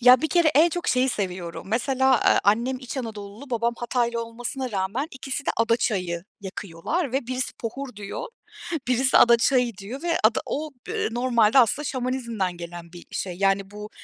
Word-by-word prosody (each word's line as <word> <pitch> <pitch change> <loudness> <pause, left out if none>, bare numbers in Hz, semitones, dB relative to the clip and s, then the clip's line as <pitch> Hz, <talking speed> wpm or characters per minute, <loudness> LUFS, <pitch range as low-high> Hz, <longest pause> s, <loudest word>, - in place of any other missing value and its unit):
Ya, 250 +1 +8
bir 315 - +1
kere 340 -3 +4
en 320 +4 +6
çok 350 +1 -3
şeyi 255 +1 +3
seviyorum. 185 -7 -4
Mesela, 260 +4 +2
aaa, - - +4
annem 235 +6 +2
İç 255 +1 -7
Anadolulu, 220 +1 -7
babam 235 0 0
Hataylı 235 -1 -1
olmasına 245 +3 -5
rağmen 200 +7 -1
ikisi 270 +2 -5
de - - +3
ada 230 0 +3
çayı 180 -7 -1 0.2
yakıyorlar 200 - -3
ve 265 -2 -1
birisi 255 0 -2
pohur 250 0 -5
diyor, 200 -1 -6 0.6
birisi 260 +1 +3
ada 235 0 +7
çayı 240 -2 +2
diyor 215 +8 -7
ve 340 -1 +1
ada 220 +1 +4
o, 310 +2 -3 0.2
ııı, - - -1
normalde 240 -1 +3
aslında 255 +5 +4
Şamanizm'den 240 -8 -2
gelen 170 0 -9
bir 175 - -12
şey. 180 -2 -4
Yani 195 0 +1
bu 210 +1 -8
235 Hz, 175 wpm, -25 LUFS, 200-260 Hz, 0.6 s, Ya